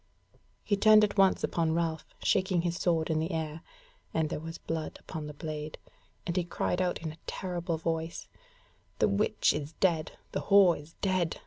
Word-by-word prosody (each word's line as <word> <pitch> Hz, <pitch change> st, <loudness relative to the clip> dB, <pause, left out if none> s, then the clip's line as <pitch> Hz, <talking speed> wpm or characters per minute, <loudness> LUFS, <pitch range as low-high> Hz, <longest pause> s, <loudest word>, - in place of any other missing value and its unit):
He 205 Hz, -, +1 dB
turned 215 Hz, +1 st, +7 dB
at 205 Hz, -1 st, +1 dB
once 195 Hz, -2 st, +4 dB
upon 165 Hz, -1 st, +1 dB
Ralph, 165 Hz, -2 st, -1 dB, 0.2 s
shaking 185 Hz, -2 st, +2 dB
his 175 Hz, -1 st, -1 dB
sword 165 Hz, -3 st, +1 dB
in 155 Hz, -, +1 dB
the 160 Hz, +2 st, -1 dB
air 160 Hz, -1 st, -3 dB, 0.5 s
(and 160 Hz, -1 st, +1 dB
there -, -, -2 dB
was 165 Hz, +1 st, -7 dB
blood 160 Hz, -1 st, -4 dB
upon 155 Hz, -2 st, -6 dB
the 150 Hz, -, -7 dB
blade) 155 Hz, 0 st, -5 dB, 0.5 s
and 170 Hz, -, -2 dB
he 180 Hz, -, +2 dB
cried 175 Hz, +1 st, -1 dB
out 180 Hz, -1 st, 0 dB
in 160 Hz, -1 st, -4 dB
terrible 175 Hz, -3 st, -3 dB
voice: 165 Hz, 0 st, -3 dB, 0.7 s
"The -, -, +3 dB
witch 210 Hz, +1 st, +2 dB
is 150 Hz, +1 st, -4 dB
dead, 165 Hz, -3 st, +1 dB, 0.2 s
the -, -, -2 dB
whore 195 Hz, -4 st, +6 dB
is 150 Hz, +3 st, -11 dB
dead! 185 Hz, -4 st, +1 dB
165 Hz, 180 wpm, -30 LUFS, 160-185 Hz, 0.7 s, turned